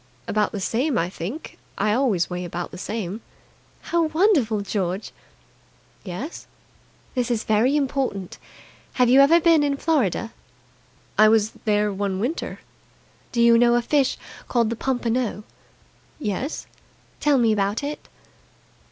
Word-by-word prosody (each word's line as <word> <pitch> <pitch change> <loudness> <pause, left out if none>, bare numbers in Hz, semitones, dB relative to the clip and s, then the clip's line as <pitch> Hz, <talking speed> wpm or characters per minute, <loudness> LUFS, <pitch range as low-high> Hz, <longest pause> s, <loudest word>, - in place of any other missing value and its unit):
"About 210 0 +1
the 205 - -4
same, 245 +7 0
I 170 +2 0
think. 200 - -7 0.2
I 210 +1 +1
always 220 -9 +1
weigh 180 0 -4
about 175 0 -5
the - - -9
same." 210 0 -4 0.7
"How 340 -1 +3
wonderful! 310 - +2
George!" 195 -1 -3 0.9
"Yes?" 215 - -7 0.7
"This 250 -2 -1
is 230 -2 0
very 225 +6 +2
important. 265 -9 -2 0.5
Have 250 -2 +3
you 265 +2 +7
ever 320 +5 +6
been 330 -2 +4
in 285 -1 0
Florida?" 245 - 0 0.9
"I 215 0 +8
was 220 -1 +3
there 210 -1 +2
one 195 -1 -2
winter." 255 - -3 0.7
"Do 235 -1 +2
you 235 0 +6
know 240 0 +5
a 240 - +3
fish 275 +1 +1 0.3
called 235 -2 +1
the - - -1
pompano?" 245 -3 -1 0.7
"Yes." 250 - -3 0.5
"Tell 295 -2 +3
me 230 -3 +3
about 205 +4 0
it." 290 +1 -6
230 Hz, 135 wpm, -23 LUFS, 205-275 Hz, 0.9 s, I